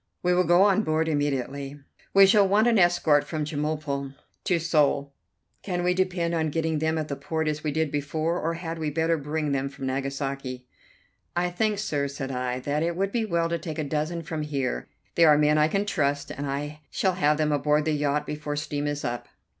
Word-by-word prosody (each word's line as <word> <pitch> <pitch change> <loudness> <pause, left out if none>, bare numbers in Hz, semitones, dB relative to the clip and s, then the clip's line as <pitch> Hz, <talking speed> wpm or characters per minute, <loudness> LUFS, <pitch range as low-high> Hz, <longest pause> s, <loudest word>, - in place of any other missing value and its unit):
We 180 0 +3
will 180 0 +3
go 175 +3 +5
on 205 +1 +4
board 160 -4 0
immediately. 140 -1 -2 0.3
We 195 0 +8
shall 200 0 +5
want 205 +3 +4
an 230 -3 +4
escort 175 -4 +4
from 155 -2 -3
Chemulpo 145 -2 -3 0.3
to 180 -4 +2
Seoul; 145 -4 +1 0.5
can 180 -3 -2
we 180 0 +3
depend 180 -2 0
on 160 -2 0
getting 160 0 -1
them 160 +1 0
at 155 -1 -2
the 140 - -3
port 160 +3 -2
as 155 0 -2
we 150 - 0
did 160 0 0
before, 155 +4 -1
or 165 +1 -1
had 165 -1 -5
we 155 -1 -1
better 165 +2 +1
bring 150 0 -2
them 140 0 -1
from 135 -1 -7
Nagasaki?" 135 -1 -3 0.7
"I 175 0 0
think, 210 +3 0
sir," 145 -9 -1
said 135 -1 -5
I, 125 0 -2
"that 145 +3 -1
it 170 +1 0
would 195 +2 -1
be 230 -1 0
well 170 -4 +1
to 170 0 -1
take 160 -3 -6
a 155 - -1
dozen 155 +3 -2
from 155 0 -4
here. 140 -4 -2 0.2
They 170 - +4
are 150 -2 +7
men 150 0 +3
I 150 - +5
can 195 +5 0
trust, 145 -7 -1
and 145 +1 -4
I 145 +2 -4
shall 190 -2 +1
have 150 -4 +2
them 150 -1 +1
aboard 150 +1 +2
the 160 - +1
yacht 150 0 0
before 150 0 -4
steam 145 0 -2
is 145 0 -3
up." 120 0 -3
155 Hz, 215 wpm, -26 LUFS, 145-170 Hz, 0.7 s, We